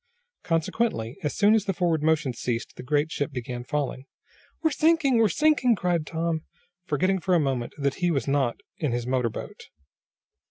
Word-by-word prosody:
Consequently, 165 Hz, -, -1 dB
as 150 Hz, -, -2 dB
soon 210 Hz, +1 st, +5 dB
as 220 Hz, -2 st, +2 dB
the 195 Hz, -, -1 dB
forward 170 Hz, -4 st, +1 dB
motion 155 Hz, -4 st, +1 dB
ceased 120 Hz, 0 st, -3 dB
the -, -, -8 dB
great 145 Hz, +4 st, 0 dB
ship 145 Hz, +2 st, -2 dB
began 125 Hz, -1 st, -5 dB
falling. 135 Hz, -1 st, -3 dB, 0.6 s
"We're 320 Hz, -, +3 dB
sinking! 300 Hz, -4 st, +3 dB
We're 220 Hz, -2 st, +4 dB
sinking!" 295 Hz, -, +3 dB
cried 175 Hz, -5 st, 0 dB
Tom, 165 Hz, -1 st, -1 dB, 0.5 s
forgetting 185 Hz, +6 st, +1 dB
for 180 Hz, +1 st, +1 dB
a -, -, +4 dB
moment 135 Hz, -5 st, -1 dB
that 140 Hz, -2 st, 0 dB
he 175 Hz, -, +3 dB
was 145 Hz, -5 st, 0 dB
not 135 Hz, -4 st, 0 dB, 0.2 s
in 145 Hz, -6 st, 0 dB
his 120 Hz, 0 st, -2 dB
motor 125 Hz, -2 st, +1 dB
boat. -, -, -8 dB
155 Hz, 175 wpm, -26 LUFS, 130-190 Hz, 0.6 s, soon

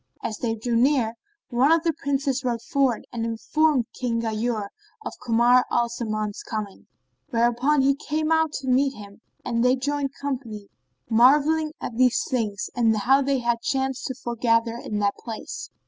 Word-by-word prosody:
As 215 Hz, -, -4 dB
they 225 Hz, -2 st, -1 dB
drew 230 Hz, +2 st, -2 dB
near, 245 Hz, -2 st, +2 dB, 0.4 s
one 255 Hz, +4 st, +3 dB
of 330 Hz, 0 st, +4 dB
the 330 Hz, -2 st, +1 dB
Princes 275 Hz, -2 st, -1 dB
rode 240 Hz, -2 st, -2 dB
forward 270 Hz, -4 st, 0 dB
and 235 Hz, -1 st, -3 dB
informed 245 Hz, +4 st, +1 dB
King 235 Hz, -2 st, -2 dB
Ghayur 220 Hz, -2 st, -2 dB, 0.4 s
of -, -, -4 dB
Kamar 240 Hz, +1 st, +4 dB
al 235 Hz, 0 st, +1 dB
Zaman's 215 Hz, -3 st, -3 dB
coming, 210 Hz, -3 st, -6 dB, 0.4 s
whereupon 240 Hz, +5 st, +2 dB
he 275 Hz, +1 st, +4 dB
came 310 Hz, +2 st, -2 dB
out 320 Hz, -1 st, +3 dB
to 270 Hz, -, -5 dB
meet 265 Hz, +2 st, +2 dB
him 205 Hz, 0 st, -12 dB, 0.2 s
and 235 Hz, -1 st, 0 dB
they 250 Hz, +1 st, +4 dB
joined 275 Hz, +1 st, -2 dB
company, 240 Hz, -8 st, -5 dB, 0.4 s
marvelling 295 Hz, +7 st, +4 dB
at 230 Hz, -, -6 dB
these 250 Hz, -1 st, +3 dB
things 215 Hz, -5 st, -2 dB
and 225 Hz, -2 st, +3 dB
how 265 Hz, +7 st, +3 dB
they 275 Hz, -1 st, 0 dB
had 235 Hz, -1 st, 0 dB
chanced 265 Hz, 0 st, -1 dB
to 260 Hz, -, -4 dB
foregather 230 Hz, -1 st, 0 dB
in 215 Hz, -3 st, -5 dB
that 205 Hz, -1 st, +1 dB
place. 225 Hz, -2 st, -7 dB
245 Hz, 165 wpm, -24 LUFS, 230-275 Hz, 0.4 s, of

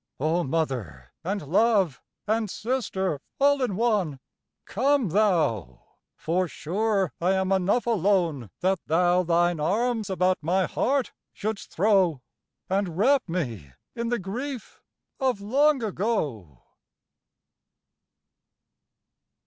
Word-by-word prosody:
O 160 Hz, +5 st, +1 dB
Mother, 130 Hz, -, -3 dB
and 195 Hz, +2 st, -2 dB
Love 195 Hz, -, +2 dB, 0.2 s
and 220 Hz, 0 st, 0 dB
Sister 190 Hz, -, -2 dB, 0.2 s
all 285 Hz, 0 st, +4 dB
in 245 Hz, -7 st, 0 dB
one, 200 Hz, -, 0 dB, 0.5 s
Come 265 Hz, 0 st, +1 dB
thou; 155 Hz, -, +1 dB, 0.3 s
for 180 Hz, +3 st, 0 dB
sure 195 Hz, +4 st, -1 dB
I 180 Hz, +3 st, +3 dB
am 190 Hz, 0 st, 0 dB
enough 195 Hz, +5 st, +2 dB
alone 180 Hz, -, +1 dB
That 190 Hz, 0 st, +1 dB
thou 175 Hz, +2 st, +3 dB
thine 175 Hz, -1 st, +2 dB
arms 220 Hz, +6 st, 0 dB
about 185 Hz, -1 st, +1 dB
my 180 Hz, +4 st, +1 dB
heart 270 Hz, -1 st, 0 dB, 0.2 s
shouldst 215 Hz, 0 st, -4 dB
throw, 190 Hz, -6 st, +3 dB, 0.5 s
And 190 Hz, -3 st, -1 dB
wrap 260 Hz, +1 st, +3 dB
me 115 Hz, -, -4 dB, 0.2 s
in 235 Hz, -1 st, -2 dB
the 240 Hz, -, +1 dB
grief 240 Hz, +7 st, -6 dB, 0.4 s
of 260 Hz, -6 st, +1 dB
long 270 Hz, +6 st, +2 dB
ago. 155 Hz, -, -2 dB
190 Hz, 110 wpm, -26 LUFS, 165-225 Hz, 0.5 s, all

